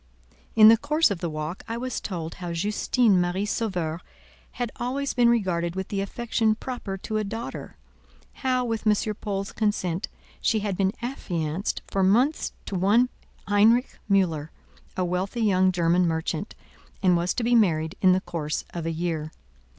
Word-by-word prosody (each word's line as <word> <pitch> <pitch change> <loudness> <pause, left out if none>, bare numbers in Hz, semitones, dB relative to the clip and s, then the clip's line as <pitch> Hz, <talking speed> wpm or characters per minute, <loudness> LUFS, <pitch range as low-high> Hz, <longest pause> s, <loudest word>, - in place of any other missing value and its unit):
In 215 -1 +9
the 225 - +7
course 300 +2 +2
of 190 - -2
the 170 -2 -2
walk 155 +3 -5
I 230 0 -3
was 255 +1 -3
told 165 -4 -4
how 175 -1 -3
Justine 205 +2 +2
Marie 175 +3 -1
Sauveur 180 -7 -2 0.5
had 245 -2 -3
always 270 +3 -2
been 240 -2 +4
regarded 180 -7 0
with 190 0 -4
the 200 -1 -1
affection 220 +1 0
proper 225 -5 -5
to 215 +3 -3
a 215 - 0
daughter—how, 245 +3 -5
with 225 -1 -2
M. 210 0 +2
Paul's 200 -2 -3
consent, 195 -5 -1 0.3
she 220 -2 +2
had 200 -2 -2
been 195 +1 +1
affianced 175 - -3
for 195 - -1
months 240 +11 +2
to - - -7
one 210 +7 +3 0.4
Heinrich 220 +5 +3
Mühler, 165 -6 +2 0.5
a 185 - +1
wealthy 185 +6 -2
young 190 -3 +3
German 175 0 +2
merchant, 160 -1 -2 0.5
and 180 -2 +5
was 175 +1 0
to 245 - -1
be 240 +1 +2
married 165 -8 +3
in 185 - +6
the 185 - +1
course 155 -4 -3
of 170 -1 -4
a - - 0
year. 160 -2 -3
195 Hz, 165 wpm, -25 LUFS, 175-225 Hz, 0.5 s, In